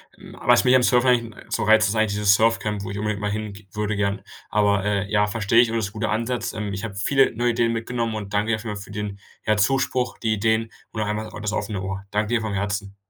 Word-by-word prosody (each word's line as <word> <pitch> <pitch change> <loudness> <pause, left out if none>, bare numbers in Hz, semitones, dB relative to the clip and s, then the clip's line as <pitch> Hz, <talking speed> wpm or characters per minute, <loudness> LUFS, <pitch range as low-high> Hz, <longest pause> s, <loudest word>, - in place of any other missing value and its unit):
Hm, - - -13
was 120 0 +5
mich 125 - +4
am 130 -1 +5
Surfen 125 +1 +4
eigentlich 115 -3 0
so - - -1
reizt, 110 0 +5
ist 105 - -2
eigentlich 110 -1 +1
dieses 105 -1 +4
Surfcamp, 110 -2 +1
wo 95 - -5
ich 100 - -5
unbedingt 105 0 -2
mal 105 0 -1
hin 105 0 -3
ge 100 0 -13
würde 105 0 -2
gern. 100 0 0 0.3
Aber, 100 -2 +2
äh, 100 -1 -1
ja, 105 -1 +3
verstehe 110 +1 +2
ich, 120 - +6
aber 115 - -2
das 110 -3 -1
ist - - -11
'n - - -25
guter - - 0
Ansatz, 115 +1 -2
ähm. 105 -2 -4
Ich 100 +3 -4
habe 100 -3 -7
viele 135 +6 +2
neue 120 +2 +1
Ideen 115 0 +1
mitgenommen 115 0 -2
und 105 -1 -6
danke 105 +2 +1
dir - - +3
auf 110 - -8
jeden 105 -2 -4
Fall 100 - -7
für - - -13
den, 105 -1 -5 0.3
ja, 110 -1 +2
Zuspruch, 130 +3 +1
die 110 - -1
Ideen 110 +2 +1 0.2
und 110 - -2
auch 105 - -1
einmal 105 +1 -2
auch 105 - -9
das 105 0 -2
offene 100 0 -3
Ohr. 95 +1 -5
Danke 105 +1 0
dir - - +2
vom 110 -2 -3
Herzen. 100 0 -3
105 Hz, 280 wpm, -23 LUFS, 100-115 Hz, 0.3 s, ich